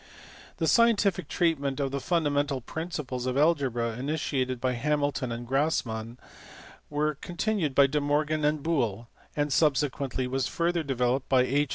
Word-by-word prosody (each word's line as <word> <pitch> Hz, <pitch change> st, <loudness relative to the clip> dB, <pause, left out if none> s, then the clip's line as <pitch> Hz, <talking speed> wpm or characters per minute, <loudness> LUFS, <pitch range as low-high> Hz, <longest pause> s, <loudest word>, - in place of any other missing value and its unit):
The 165 Hz, -, 0 dB
scientific 205 Hz, -5 st, +3 dB
treatment 145 Hz, -6 st, 0 dB
of 135 Hz, -1 st, -1 dB
the 140 Hz, -, -2 dB
fundamental 145 Hz, -4 st, 0 dB
principles 140 Hz, -3 st, -5 dB
of 130 Hz, +1 st, -1 dB
algebra 135 Hz, -7 st, +2 dB
initiated 130 Hz, -3 st, -1 dB
by 130 Hz, +1 st, 0 dB
Hamilton 145 Hz, 0 st, -1 dB
and 120 Hz, +1 st, -5 dB
Grassman, 120 Hz, -5 st, -1 dB, 0.7 s
was 150 Hz, 0 st, -1 dB
con 175 Hz, -, -8 dB
tinued 185 Hz, -9 st, 0 dB
by 140 Hz, -, +7 dB
De 145 Hz, +2 st, 0 dB
Morgan 150 Hz, +2 st, 0 dB
and 150 Hz, -1 st, +1 dB
Boole, 120 Hz, -9 st, -1 dB, 0.3 s
and 145 Hz, -1 st, 0 dB
subsequently 140 Hz, -3 st, +1 dB
was 130 Hz, 0 st, -1 dB
further 170 Hz, 0 st, 0 dB
developed 130 Hz, -2 st, -1 dB
by 130 Hz, -2 st, +5 dB
H. 140 Hz, +2 st, +1 dB
145 Hz, 150 wpm, -28 LUFS, 130-155 Hz, 0.7 s, by